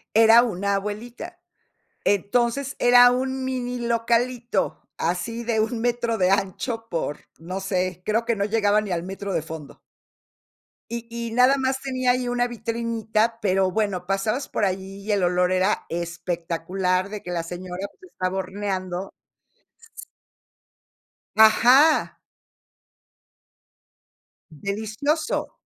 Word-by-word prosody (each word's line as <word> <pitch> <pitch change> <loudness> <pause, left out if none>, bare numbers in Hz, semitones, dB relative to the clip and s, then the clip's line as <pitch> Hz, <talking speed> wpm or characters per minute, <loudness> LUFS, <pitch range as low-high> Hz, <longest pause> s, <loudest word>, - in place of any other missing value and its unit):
Era 225 +1 +8
una 200 -3 -1
abuelita. 235 - -5 0.7
Entonces, 235 +7 +1
era 245 0 +7
un 260 +1 -1
mini 250 -1 -3
localito, 235 +1 0
así 180 +8 -2
de 230 -1 0
1 225 +2 0
metro 235 -1 0
de 185 -2 +3
ancho 210 +4 -1
por, 160 -3 -3 0.2
no 180 +4 -5
sé, 185 -2 -2
creo 225 +2 +1
que 235 -1 +1
no 200 -1 0
llegaba 210 -1 +2
ni 210 -2 -5
al 170 -1 -1
metro 195 +1 -5
de - - 0
fondo. 160 -2 -9 1.1
Y 235 0 -4
y 235 0 -5
nada 250 +3 +5
más 265 0 -1
tenía 255 -2 0
ahí 250 0 +1
una 245 0 0
vitrinita, 230 -1 -1
pero, 190 -3 +2
bueno, 190 -3 -1
pasabas 215 +7 -1
por - - 0
ahí 195 +1 -3
y 215 - 0
el 200 -2 +1
olor 180 +1 +2
era 185 +3 +1
espectacular, 175 +2 -2
de 210 -1 -6
que 180 - -7
la 170 -2 -2
señora, 180 +2 -6
pues, 370 -1 -16
estaba 185 +1 -2
horneando. 190 -1 -3 2.3
Ajá. 250 +8 +6 2.4
Delicioso. 220 - -2
215 Hz, 125 wpm, -24 LUFS, 185-240 Hz, 2.4 s, Era